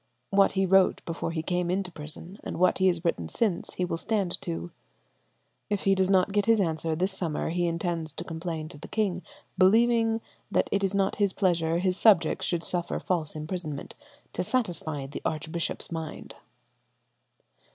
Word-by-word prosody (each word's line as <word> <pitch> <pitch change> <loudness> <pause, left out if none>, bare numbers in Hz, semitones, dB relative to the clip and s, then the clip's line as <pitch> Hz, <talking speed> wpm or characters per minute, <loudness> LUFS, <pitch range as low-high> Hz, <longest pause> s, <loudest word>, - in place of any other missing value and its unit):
What 195 0 +4
he 195 0 +2
wrote 190 0 +4
before 165 0 -3
he 160 -1 -3
came 175 0 0
into 185 0 -1
prison 165 +5 -6
and - - -5
what 180 +2 +3
he 190 - +4
has 175 -1 +1
written 85 - 0
since 205 -7 -1
he 180 - 0
will 165 - -2
stand 195 -2 -1
to.... 85 +1 -4 1.0
If 205 -2 -1
he 195 - +4
does 190 -1 +2
not 190 0 +4
get 205 +1 +1
his 225 -1 +5
answer 160 -3 0
this 185 +5 0
summer 165 -4 -2
he 175 0 +1
intends 165 -1 -2
to 170 - -5
complain 165 -2 -4
to 165 - -11
the - - -9
king, 195 -5 0 0.4
believing 225 +3 +4 0.3
that - - +2
it 200 0 +1
is 195 0 +1
not 195 -1 +1
his 200 -2 +2
pleasure 170 -4 +1
his 185 +1 +1
subjects 185 -8 +4
should 170 -1 -1
suffer 175 -1 -1
false 165 -5 -1
imprisonment 155 -2 -4 0.4
to - - -1
satisfy 170 - -1
the 135 - -7
archbishop's 160 +3 -2
mind." 160 -2 -6
175 Hz, 175 wpm, -28 LUFS, 165-195 Hz, 1.0 s, his